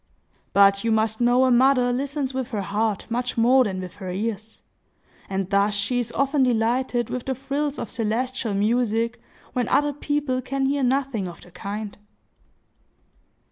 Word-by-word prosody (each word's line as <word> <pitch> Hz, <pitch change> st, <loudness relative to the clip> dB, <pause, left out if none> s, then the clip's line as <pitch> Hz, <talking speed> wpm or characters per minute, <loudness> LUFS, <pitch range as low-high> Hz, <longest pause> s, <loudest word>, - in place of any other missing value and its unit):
But 200 Hz, 0 st, +5 dB
you 230 Hz, -, +1 dB
must 220 Hz, +1 st, +1 dB
know 245 Hz, +2 st, +4 dB
a 255 Hz, -, +3 dB
mother 250 Hz, 0 st, +4 dB
listens 275 Hz, +1 st, -2 dB
with 260 Hz, -2 st, -2 dB
her 210 Hz, -5 st, -3 dB
heart 205 Hz, +1 st, -1 dB
much 245 Hz, +1 st, -2 dB
more 250 Hz, +3 st, +5 dB
than 190 Hz, -3 st, -3 dB
with 180 Hz, 0 st, -9 dB
her 190 Hz, -3 st, -6 dB
ears; 215 Hz, +3 st, -4 dB, 0.7 s
and 190 Hz, -1 st, -2 dB
thus 200 Hz, +1 st, +2 dB
she 225 Hz, +5 st, 0 dB
is 235 Hz, -1 st, -3 dB
often 275 Hz, +1 st, +1 dB
delighted 240 Hz, 0 st, +1 dB
with 250 Hz, -, -4 dB
the 265 Hz, -, 0 dB
trills 280 Hz, +2 st, -2 dB
of 220 Hz, -, -5 dB
celestial 230 Hz, 0 st, -2 dB
music, 230 Hz, +2 st, 0 dB, 0.3 s
when 245 Hz, -2 st, 0 dB
other 290 Hz, 0 st, +2 dB
people 290 Hz, -3 st, -1 dB
can 270 Hz, +2 st, -2 dB
hear 280 Hz, +1 st, +1 dB
nothing 255 Hz, -6 st, 0 dB
of 170 Hz, -1 st, -10 dB
the 175 Hz, -, -16 dB
kind. 205 Hz, +3 st, -6 dB
240 Hz, 165 wpm, -24 LUFS, 210-260 Hz, 0.7 s, But